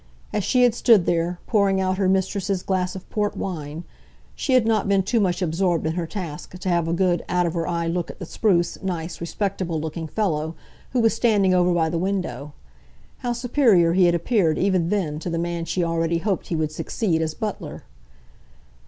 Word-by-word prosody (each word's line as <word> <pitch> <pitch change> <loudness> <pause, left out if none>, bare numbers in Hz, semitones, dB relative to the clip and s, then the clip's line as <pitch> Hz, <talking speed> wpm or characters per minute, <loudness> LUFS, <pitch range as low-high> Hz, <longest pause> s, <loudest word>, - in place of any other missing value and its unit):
As 210 - 0
she 250 +4 +3
had 245 -2 +5
stood 225 -6 +4
there, 170 +1 0
pouring 200 -3 +2
out 185 0 0
her 190 -2 +2
mistress's 190 0 0
glass 185 -1 -1
of 190 - -9
port 210 -1 -1
wine, 160 -3 -5 0.5
she 270 - -1
had 255 -3 +5
not 220 -3 +1
been 195 -1 +3
too 230 +5 +1
much 185 -2 +1
absorbed 175 0 0
in 160 - 0
her 170 -1 -3
task 175 -2 -6
to 185 - -3
have 170 -2 +1
a - - -1
good 175 -1 +1
out 180 0 +2
of 165 - -1
her 165 -2 -2
eye 170 -1 -1
look 170 +1 -2
at - - -9
the 180 - -7
spruce, 175 -2 0
nice, 175 -4 -4
respectable 185 -2 -2
looking 160 +1 -4
fellow 160 -4 -1 0.4
who 250 - +2
was 225 -1 +3
standing 205 -6 +3
over 180 0 +3
by 170 -2 +2
the 165 +1 -1
window. 165 -7 -3 0.7
How 245 -1 -1
superior 235 -8 +3
he 185 0 +5
had 175 0 +4
appeared 170 -2 +1
even 185 -3 +1
then 165 -7 -1
to 175 - -4
the 165 - -2
man 170 0 -2
she 175 +2 -1
already 165 0 0
hoped 195 +2 -2
he 170 - -2
would 155 -1 -1
succeed 165 +1 -1
as 160 -1 -2
butler! 210 -2 -5
180 Hz, 205 wpm, -23 LUFS, 165-200 Hz, 0.7 s, had